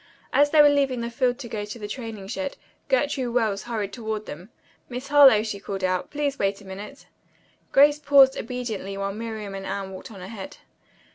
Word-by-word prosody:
As 290 Hz, 0 st, +5 dB
they 310 Hz, 0 st, +4 dB
were 290 Hz, -, +7 dB
leaving 275 Hz, -4 st, +1 dB
the 235 Hz, 0 st, -4 dB
field 245 Hz, +1 st, +1 dB
to 260 Hz, -, -8 dB
go 215 Hz, -2 st, -4 dB
to 210 Hz, +3 st, -7 dB
the 210 Hz, -2 st, -6 dB
training 220 Hz, -4 st, -7 dB
shed 280 Hz, +6 st, -4 dB, 0.3 s
Gertrude 280 Hz, -, 0 dB
Wells 215 Hz, -5 st, +1 dB
hurried 220 Hz, -4 st, -3 dB
toward 220 Hz, -3 st, -4 dB
them. 175 Hz, +7 st, -9 dB, 0.4 s
"Miss 255 Hz, +3 st, -6 dB
Harlowe," 275 Hz, -7 st, +7 dB
she 215 Hz, -3 st, -4 dB
called, 195 Hz, -1 st, -5 dB, 0.3 s
"please 285 Hz, -1 st, -2 dB
wait 195 Hz, 0 st, 0 dB
a 200 Hz, -, -15 dB
minute." 205 Hz, +8 st, -9 dB, 0.7 s
Grace 290 Hz, +2 st, +5 dB
paused 280 Hz, -2 st, +6 dB
obediently 220 Hz, -5 st, -4 dB
while 195 Hz, 0 st, -2 dB
Miriam 220 Hz, -2 st, -6 dB
and 195 Hz, 0 st, -6 dB
Anne 195 Hz, -1 st, -4 dB
walked 185 Hz, -, -9 dB
on 200 Hz, -4 st, -11 dB
ahead. 210 Hz, +9 st, -8 dB
230 Hz, 190 wpm, -25 LUFS, 200-275 Hz, 0.7 s, were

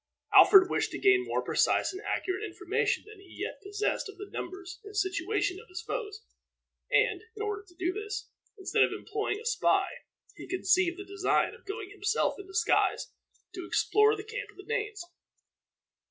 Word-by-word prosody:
Alfred 385 Hz, -2 st, +9 dB
wished -, -, 0 dB
to -, -, -5 dB
gain 385 Hz, -2 st, +4 dB
more -, -, -1 dB
precise -, -, +2 dB
and 380 Hz, -, -7 dB
accurate 380 Hz, -1 st, -2 dB
information 410 Hz, -5 st, -1 dB
than 430 Hz, -1 st, -13 dB
he 390 Hz, -2 st, -15 dB
yet -, -, -4 dB
possessed 410 Hz, 0 st, -2 dB
of 400 Hz, -, -11 dB
the 405 Hz, +1 st, -9 dB
numbers 370 Hz, 0 st, -6 dB
and 410 Hz, 0 st, -9 dB
situation 390 Hz, 0 st, 0 dB
of 455 Hz, -, -16 dB
his 355 Hz, -1 st, -6 dB
foes; 440 Hz, -2 st, -5 dB, 0.7 s
and, -, -, +3 dB
in 425 Hz, -, -7 dB
order 415 Hz, -1 st, -3 dB
to 350 Hz, -, -20 dB
do 360 Hz, 0 st, -1 dB
this, 420 Hz, +1 st, -5 dB, 0.3 s
instead 385 Hz, -, 0 dB
of -, -, +5 dB
employing 420 Hz, 0 st, -3 dB
a 460 Hz, -, -12 dB
spy, 480 Hz, -, +3 dB, 0.5 s
he -, -, -10 dB
conceived 365 Hz, -1 st, +2 dB
the 395 Hz, -, -7 dB
design 395 Hz, 0 st, +1 dB
of -, -, -16 dB
going 405 Hz, -1 st, -5 dB
himself 410 Hz, +2 st, 0 dB
in 395 Hz, -, -9 dB
disguise 385 Hz, +3 st, +1 dB, 0.4 s
to 365 Hz, 0 st, -6 dB
explore 425 Hz, +1 st, +3 dB
the 410 Hz, -, -7 dB
camp -, -, -6 dB
of -, -, -18 dB
the 390 Hz, -, -11 dB
Danes. 425 Hz, -4 st, -3 dB
405 Hz, 180 wpm, -29 LUFS, 375-425 Hz, 0.7 s, Alfred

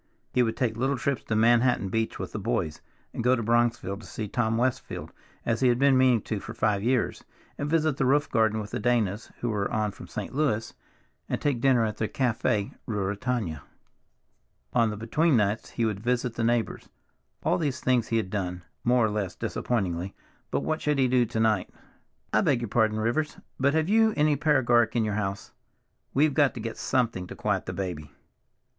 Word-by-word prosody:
He 125 Hz, -, +3 dB
would 115 Hz, -2 st, 0 dB
take 120 Hz, -5 st, 0 dB
little 135 Hz, +3 st, 0 dB
trips 135 Hz, 0 st, -1 dB
to 110 Hz, -, -1 dB
Manhattan 120 Hz, -1 st, +3 dB
Beach 115 Hz, +3 st, -1 dB
with -, -, -5 dB
"the -, -, -4 dB
boys" 75 Hz, +4 st, -2 dB, 0.3 s
and -, -, -3 dB
go 125 Hz, +2 st, +4 dB
to 115 Hz, -, -3 dB
Bronxville 115 Hz, -3 st, +1 dB
to -, -, -12 dB
see 110 Hz, -, -5 dB
Tom 115 Hz, +1 st, 0 dB
Westfield, 130 Hz, +1 st, -2 dB, 0.3 s
as 115 Hz, -1 st, 0 dB
he 130 Hz, -, +3 dB
had 120 Hz, -1 st, +3 dB
been 135 Hz, +1 st, +4 dB
meaning 130 Hz, -4 st, +4 dB
to 110 Hz, -, -3 dB
for 110 Hz, +3 st, -8 dB
five 105 Hz, -3 st, +1 dB
years, 125 Hz, +2 st, 0 dB, 0.3 s
and 145 Hz, -, -3 dB
visit 155 Hz, -3 st, +2 dB
the 135 Hz, -, +1 dB
roof 145 Hz, +3 st, +3 dB
garden 110 Hz, -1 st, +2 dB
with 105 Hz, -1 st, -6 dB
the -, -, -2 dB
Danas, 110 Hz, -3 st, 0 dB
who 120 Hz, -, -1 dB
were 100 Hz, -2 st, -1 dB
on 110 Hz, -2 st, 0 dB
from -, -, -11 dB
St. -, -, -6 dB
Louis, 130 Hz, -6 st, 0 dB, 0.6 s
and -, -, -1 dB
take 140 Hz, -5 st, 0 dB
dinner 125 Hz, -4 st, +4 dB
at 105 Hz, -1 st, -3 dB
the 110 Hz, -, -1 dB
Café 115 Hz, -4 st, 0 dB
Ruritania. 105 Hz, -, -2 dB, 1.1 s
On 115 Hz, -2 st, +3 dB
the 105 Hz, -, -5 dB
between 140 Hz, +7 st, +2 dB
nights 105 Hz, +1 st, 0 dB
he 115 Hz, -, -1 dB
would 105 Hz, -3 st, -1 dB
visit 125 Hz, +1 st, 0 dB
the 115 Hz, -, -2 dB
neighbors. 115 Hz, 0 st, 0 dB, 0.5 s
All -, -, +2 dB
these 140 Hz, -5 st, -1 dB
things 125 Hz, -3 st, +1 dB
he 115 Hz, -, +1 dB
had 95 Hz, -4 st, -2 dB
done, 90 Hz, -3 st, -3 dB, 0.2 s
more 120 Hz, -1 st, +4 dB
or 110 Hz, -, 0 dB
less 100 Hz, -4 st, -2 dB
disappointingly, 95 Hz, -5 st, -2 dB, 0.3 s
but -, -, 0 dB
what 155 Hz, 0 st, -1 dB
should 150 Hz, -1 st, +1 dB
he 130 Hz, -1 st, +3 dB
do 125 Hz, -1 st, +3 dB
to 110 Hz, -, -3 dB
night? 110 Hz, -4 st, +2 dB, 0.6 s
"I -, -, +4 dB
beg 125 Hz, -3 st, +2 dB
your 120 Hz, -, -4 dB
pardon, 110 Hz, -1 st, +2 dB
Rivers, 120 Hz, +8 st, -1 dB, 0.2 s
but 140 Hz, +3 st, +2 dB
have 160 Hz, 0 st, +2 dB
you 220 Hz, +1 st, +4 dB
any 150 Hz, 0 st, +3 dB
paregoric 130 Hz, -6 st, +3 dB
in 115 Hz, -, +2 dB
the 105 Hz, -, -1 dB
house? 100 Hz, -1 st, -3 dB, 0.6 s
We've 145 Hz, +2 st, +3 dB
got 140 Hz, -2 st, +3 dB
to -, -, -5 dB
get 115 Hz, +1 st, -5 dB
something 115 Hz, -8 st, 0 dB
to -, -, -8 dB
quiet -, -, -1 dB
the -, -, -3 dB
baby." 85 Hz, -7 st, -4 dB
115 Hz, 200 wpm, -27 LUFS, 105-130 Hz, 1.1 s, go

